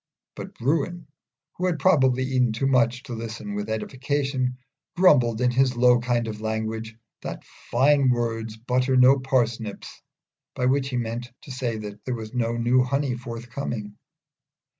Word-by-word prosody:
But -, -, -8 dB
Bruin, 160 Hz, +5 st, -1 dB, 0.5 s
who 185 Hz, -, 0 dB
had 175 Hz, -3 st, 0 dB
probably 130 Hz, -8 st, +3 dB
eaten 130 Hz, -3 st, +1 dB
too 120 Hz, +5 st, -1 dB
much 125 Hz, -1 st, +2 dB
to 125 Hz, -, -7 dB
listen 110 Hz, -2 st, -6 dB
with 105 Hz, +1 st, -4 dB
edification, 130 Hz, +2 st, -2 dB, 0.4 s
grumbled 125 Hz, -11 st, +4 dB
in 125 Hz, 0 st, +3 dB
his 130 Hz, 0 st, +2 dB
low 125 Hz, 0 st, +5 dB
kind 120 Hz, -1 st, 0 dB
of 105 Hz, -1 st, -6 dB
language, 110 Hz, 0 st, -3 dB, 0.3 s
that -, -, -6 dB, 0.3 s
"Fine 135 Hz, +2 st, +4 dB
words 115 Hz, -2 st, -1 dB
butter 125 Hz, +3 st, +1 dB
no 130 Hz, +2 st, +6 dB
parsnips," 120 Hz, -5 st, -2 dB, 0.5 s
by 125 Hz, -, -1 dB
which 135 Hz, +1 st, +1 dB
he 125 Hz, -, -2 dB
meant 120 Hz, +1 st, -4 dB
to 140 Hz, -, -10 dB
say 125 Hz, -3 st, -2 dB
that 105 Hz, -1 st, -8 dB
there 125 Hz, -, -2 dB
was 110 Hz, 0 st, -8 dB
no 115 Hz, -2 st, 0 dB
new 120 Hz, +2 st, +3 dB
honey 135 Hz, 0 st, 0 dB
forthcoming. 120 Hz, -3 st, -6 dB
125 Hz, 155 wpm, -25 LUFS, 115-130 Hz, 0.5 s, no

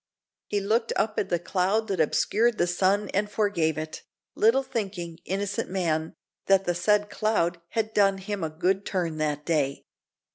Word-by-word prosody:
He 205 Hz, -, 0 dB
looked 225 Hz, +4 st, 0 dB
up 215 Hz, 0 st, 0 dB
at 195 Hz, -, -2 dB
the 175 Hz, -, +2 dB
cloud 190 Hz, +5 st, 0 dB
that 190 Hz, -3 st, -1 dB
obscured 220 Hz, +8 st, +2 dB
the -, -, +3 dB
sun, 190 Hz, +3 st, +1 dB
and 205 Hz, +2 st, 0 dB
forgave 200 Hz, -8 st, 0 dB
it, 155 Hz, 0 st, -5 dB, 0.3 s
little 230 Hz, +5 st, +3 dB
thinking, 195 Hz, -10 st, -4 dB
innocent 200 Hz, +1 st, -2 dB
man, 165 Hz, -4 st, -1 dB, 0.3 s
that 195 Hz, 0 st, +4 dB
the 175 Hz, -, +1 dB
said 205 Hz, +4 st, +2 dB
cloud 175 Hz, -6 st, 0 dB
had 220 Hz, -1 st, -1 dB
done 195 Hz, -1 st, +4 dB
him 195 Hz, -1 st, -4 dB
a 160 Hz, -, -1 dB
good 185 Hz, +5 st, 0 dB
turn 170 Hz, -6 st, -2 dB
that 150 Hz, -1 st, -1 dB
day. 145 Hz, -5 st, 0 dB
195 Hz, 170 wpm, -26 LUFS, 170-210 Hz, 0.3 s, that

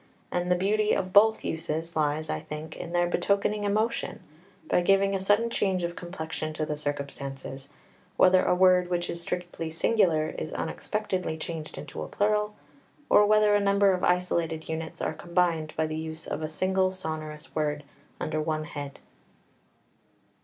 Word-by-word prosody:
And 180 Hz, 0 st, -1 dB
the 180 Hz, -, +4 dB
beauty 210 Hz, +3 st, +2 dB
of 185 Hz, 0 st, -2 dB
both 220 Hz, +2 st, +5 dB
uses 160 Hz, +1 st, -3 dB
lies, 155 Hz, 0 st, 0 dB
I 75 Hz, -, -2 dB
think, 150 Hz, -, -7 dB
in 170 Hz, -, -7 dB
their 175 Hz, 0 st, +2 dB
betokening 200 Hz, +3 st, +1 dB
emotion, 215 Hz, +3 st, -1 dB, 0.5 s
by -, -, +3 dB
giving 195 Hz, +2 st, +3 dB
a 195 Hz, -, 0 dB
sudden 205 Hz, +5 st, +2 dB
change 190 Hz, -5 st, 0 dB
of 170 Hz, 0 st, -2 dB
complexion 160 Hz, -3 st, -5 dB
to 155 Hz, 0 st, -2 dB
the 150 Hz, -, -2 dB
circumstances, 140 Hz, -2 st, -5 dB, 0.5 s
whether 185 Hz, 0 st, +6 dB
a -, -, +3 dB
word 180 Hz, -1 st, +5 dB
which 175 Hz, -1 st, -1 dB
is 170 Hz, -, -5 dB
strictly 175 Hz, -2 st, -4 dB
singular 160 Hz, -2 st, +2 dB
is 155 Hz, -, -5 dB
unexpectedly 185 Hz, -6 st, -2 dB
changed 160 Hz, -1 st, -5 dB
into -, -, -7 dB
a -, -, -4 dB
plural, 210 Hz, 0 st, 0 dB, 0.6 s
or 205 Hz, -, +7 dB
whether 210 Hz, 0 st, +5 dB
a 205 Hz, -, +5 dB
number 200 Hz, 0 st, +4 dB
of 185 Hz, -1 st, -1 dB
isolated 170 Hz, -3 st, +1 dB
units 160 Hz, 0 st, -4 dB
are -, -, -1 dB
combined 170 Hz, -1 st, 0 dB
by 160 Hz, -, +2 dB
the 155 Hz, 0 st, -3 dB
use 160 Hz, 0 st, -5 dB
of -, -, -4 dB
a 155 Hz, -, -3 dB
single 185 Hz, +3 st, +1 dB
sonorous 155 Hz, -4 st, -6 dB
word 150 Hz, -1 st, -1 dB, 0.4 s
under 155 Hz, 0 st, -1 dB
one 155 Hz, 0 st, -1 dB
head. 145 Hz, -2 st, -7 dB
175 Hz, 165 wpm, -27 LUFS, 155-195 Hz, 0.6 s, or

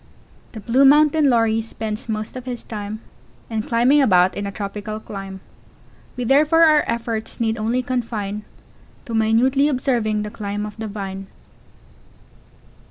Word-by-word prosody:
] -, -, -30 dB
The 220 Hz, -, -7 dB
Blue 240 Hz, +6 st, +2 dB
Mountain 300 Hz, +1 st, +5 dB
Lory 225 Hz, -2 st, +2 dB
spends 220 Hz, 0 st, -5 dB
most 215 Hz, +1 st, -4 dB
of 255 Hz, -1 st, -7 dB
his 245 Hz, -2 st, -5 dB
time 215 Hz, 0 st, -6 dB, 0.5 s
In 220 Hz, -1 st, -1 dB
climbing 245 Hz, +6 st, +3 dB
about 185 Hz, -7 st, +4 dB
in 200 Hz, 0 st, -3 dB
a -, -, -4 dB
tropical 210 Hz, +2 st, -5 dB
clime; 195 Hz, -2 st, -8 dB, 0.8 s
We 250 Hz, -, -2 dB
therefore 300 Hz, +6 st, +4 dB
our 305 Hz, -2 st, +5 dB
efforts 230 Hz, -1 st, -3 dB
need 225 Hz, -1 st, 0 dB
only 235 Hz, +4 st, 0 dB
confine, 220 Hz, -5 st, -3 dB, 0.6 s
To 230 Hz, -, -7 dB
minutely 235 Hz, +6 st, +3 dB
observing 240 Hz, -6 st, 0 dB
the 210 Hz, -, -6 dB
climb 205 Hz, -1 st, -4 dB
of 210 Hz, -1 st, -8 dB
the 220 Hz, 0 st, -5 dB
Vine. 195 Hz, -2 st, -6 dB
225 Hz, 150 wpm, -21 LUFS, 210-255 Hz, 0.8 s, Mountain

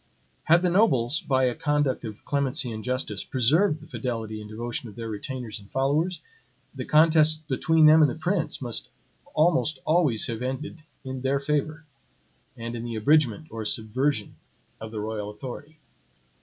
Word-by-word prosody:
Had 170 Hz, +2 st, +5 dB
the 180 Hz, -, +3 dB
nobles, 155 Hz, -, +3 dB
by 130 Hz, -2 st, +1 dB
a 125 Hz, -1 st, +2 dB
conduct 145 Hz, -2 st, 0 dB
of 110 Hz, -1 st, -9 dB
clemency 135 Hz, -3 st, 0 dB
and 110 Hz, -1 st, -6 dB
justice, 125 Hz, -5 st, -3 dB
preserved 150 Hz, -, +2 dB
the -, -, -12 dB
fidelity 110 Hz, -6 st, -4 dB
and 105 Hz, -, -10 dB
devotion 120 Hz, +1 st, -4 dB
of 100 Hz, -, -14 dB
their 115 Hz, 0 st, -6 dB
retainers 120 Hz, +1 st, -5 dB
and 100 Hz, -1 st, -17 dB
followers, 150 Hz, +7 st, 0 dB, 0.5 s
the -, -, -6 dB
contests 155 Hz, 0 st, +5 dB
between 160 Hz, +3 st, +3 dB
them 155 Hz, +1 st, +8 dB
and 150 Hz, -, +6 dB
the -, -, -4 dB
prince 160 Hz, -2 st, -2 dB
must 120 Hz, -2 st, -2 dB, 0.5 s
almost 160 Hz, -2 st, +2 dB
always 155 Hz, -9 st, +3 dB
have 115 Hz, 0 st, -4 dB
ended 140 Hz, +6 st, -4 dB, 0.2 s
in 130 Hz, -1 st, -5 dB
their 135 Hz, +1 st, +1 dB
favor, 150 Hz, +2 st, -2 dB, 0.7 s
and 115 Hz, +1 st, -5 dB
in 115 Hz, -, -5 dB
the 120 Hz, -1 st, -4 dB
abridgment 140 Hz, +3 st, +2 dB
or 115 Hz, -1 st, -5 dB
subversion 115 Hz, +1 st, -1 dB, 0.4 s
of 110 Hz, -, -7 dB
the 110 Hz, -1 st, -5 dB
royal 105 Hz, -1 st, -4 dB
authority. 130 Hz, +8 st, -9 dB
130 Hz, 165 wpm, -26 LUFS, 115-155 Hz, 0.7 s, them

